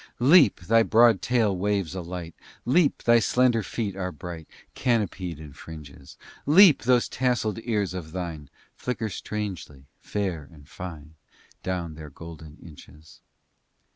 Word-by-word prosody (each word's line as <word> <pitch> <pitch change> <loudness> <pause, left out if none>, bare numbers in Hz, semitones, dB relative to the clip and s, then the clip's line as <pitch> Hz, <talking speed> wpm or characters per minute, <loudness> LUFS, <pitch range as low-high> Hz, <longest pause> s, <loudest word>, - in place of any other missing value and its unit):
V 120 - -1
Leap! 145 - +6
thy 115 +6 +4
broad 115 -2 +4
tail 115 -5 +1
waves 100 -2 -1
a 95 - -4
light, 85 -1 -7 0.3
Leap! 145 +4 +2
thy 120 0 +5
slender 120 +1 +2
feet 105 -2 -4
are 90 -1 -3
bright, 80 0 -9 0.3
Canopied 100 - -1
in 75 -3 -11
fringes; 70 -4 -12 0.3
Leap! 170 +1 +7
those 125 0 +3
tasselled 120 -4 -1
ears 105 -6 -1
of 85 -4 -7
thine 85 -5 -6 0.2
Flicker 120 -3 -4
strangely, 95 -9 -6
fair 90 -9 -4
and 70 -3 -16
fine 80 -4 -9 0.5
Down 90 -3 -3
their 75 -1 -10
gold 80 +2 -11
inches. 75 -1 -15
95 Hz, 140 wpm, -25 LUFS, 80-115 Hz, 0.5 s, Leap